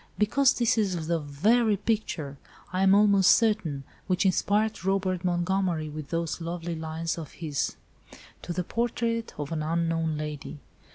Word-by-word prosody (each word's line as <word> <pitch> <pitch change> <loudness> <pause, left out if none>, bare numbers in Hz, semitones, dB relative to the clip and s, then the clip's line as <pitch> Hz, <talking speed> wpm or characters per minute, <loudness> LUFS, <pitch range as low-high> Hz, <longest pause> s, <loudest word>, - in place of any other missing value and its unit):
"Because 255 +6 +3
this 235 -1 +2
is 185 -6 -1
the 170 +1 0
very 205 +10 +2
picture, 180 - -2 0.3
I 185 - 0
am 195 0 +6
almost 200 -2 +5
certain, 195 -11 +2 0.2
which 185 +1 +1
inspired 205 +2 +1
Robert 190 -1 0
Montgomery 175 -2 0
with 150 -1 -7
those 170 0 -2
lovely 170 0 -4
lines 160 +1 -3
of 155 -4 -8
his: 150 -4 -2 0.7
'To - - -6
the 180 +1 -1
Portrait 230 +2 -1
of 145 0 -5
an 160 -2 -2
Unknown 165 0 0
Lady. 150 -1 -5
175 Hz, 150 wpm, -27 LUFS, 160-205 Hz, 0.7 s, am